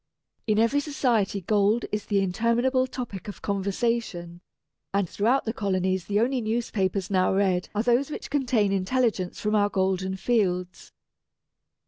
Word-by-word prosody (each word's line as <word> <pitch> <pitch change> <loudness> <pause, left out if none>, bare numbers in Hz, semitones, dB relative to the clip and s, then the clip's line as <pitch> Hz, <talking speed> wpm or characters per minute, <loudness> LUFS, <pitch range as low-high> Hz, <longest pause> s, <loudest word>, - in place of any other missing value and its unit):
In 215 -1 +2
every 230 +6 +3
society 245 -9 0
gold 210 +4 +2
is 210 0 -3
the 200 -2 +2
interminable 235 +7 +1
topic 240 -7 -6
of 205 - -8
conversation; 200 -3 -2 0.5
and 200 -2 +1
throughout 235 +10 +1
the 225 - -2
colonies 190 -4 -1
the 205 0 0
only 250 +2 +1
newspapers 210 -4 -1
now 185 -1 +3
read 190 -2 +1
are 210 - +1
those 245 +4 +2
which 300 - -7
contain 250 -8 +1
intelligence 195 -1 0
from 210 0 -1
our 205 -1 +3
golden 190 -1 0
fields. 185 -4 -1
205 Hz, 140 wpm, -26 LUFS, 190-235 Hz, 0.5 s, every